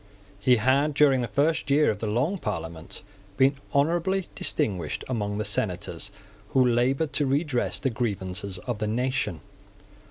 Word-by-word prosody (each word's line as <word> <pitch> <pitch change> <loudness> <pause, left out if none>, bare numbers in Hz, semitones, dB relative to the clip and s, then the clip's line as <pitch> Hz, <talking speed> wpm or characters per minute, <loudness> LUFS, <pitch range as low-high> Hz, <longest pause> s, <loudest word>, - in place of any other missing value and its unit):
He 125 +5 +5
had, 135 +6 +2
during 135 -3 +5
the 120 - -1
first 145 +7 +1
year 145 +2 +4
of 105 - -5
the 110 - -3
Long 135 - 0
Parliament, 85 - -5 0.3
been 135 +1 +4
honourably 170 +6 +1
distinguished 90 -7 -1
among 105 -5 -2
the 105 - -2
senators - - -2 0.4
who 130 -1 +5
laboured 130 +6 +1
to 145 - +1
redress 140 -2 0
the 135 - -1
grievances 100 -5 -3
of 115 +4 -4
the 105 - -1
nation. 120 -6 -1
125 Hz, 150 wpm, -26 LUFS, 105-140 Hz, 0.4 s, He